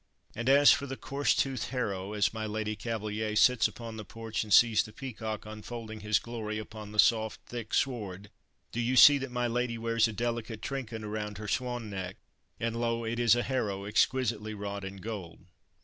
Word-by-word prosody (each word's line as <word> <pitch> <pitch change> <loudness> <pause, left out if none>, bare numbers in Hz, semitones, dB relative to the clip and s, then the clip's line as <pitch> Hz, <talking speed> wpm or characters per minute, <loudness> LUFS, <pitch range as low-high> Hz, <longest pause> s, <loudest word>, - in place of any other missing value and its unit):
And 115 +3 -1
as 140 +1 +8
for 140 -2 +1
the 135 0 -5
coarse 140 +1 0
toothed 130 -4 0
harrow 100 -6 -3
as 105 0 +1
my 110 -1 -3
Lady 110 0 -2
Cavaliere 105 -1 -3
sits 110 0 +5
upon 115 -2 -8
the 110 - -6
porch 115 0 -4
and 105 - -10
sees 115 0 +6
the 110 - -8
peacock 110 -3 -5
unfolding 110 +1 -7
his 105 0 +2
glory 110 -2 -4
upon 110 -1 -8
the 105 - -9
soft, 110 0 +3
thick 120 -3 -7
sward, 100 -6 -1 0.4
do 120 - -4
you 120 +2 +1
see 145 +2 +9
that 135 0 -4
my 125 0 -1
lady 120 0 -1
wears 115 0 +2
a - - -4
delicate 115 0 -3
trinket 120 -5 -4
around 105 -1 -4
her 105 0 -6
swan 120 -2 -2
neck, 95 -1 -5 0.4
and 115 0 -1
lo! 115 0 0
it 115 +1 -2
is 120 -1 +5
a 120 - 0
harrow 105 -7 -2
exquisitely 110 0 +1
wrought 100 -1 -5
in 95 +1 -6
gold. 95 -4 -7
110 Hz, 195 wpm, -30 LUFS, 105-120 Hz, 0.4 s, see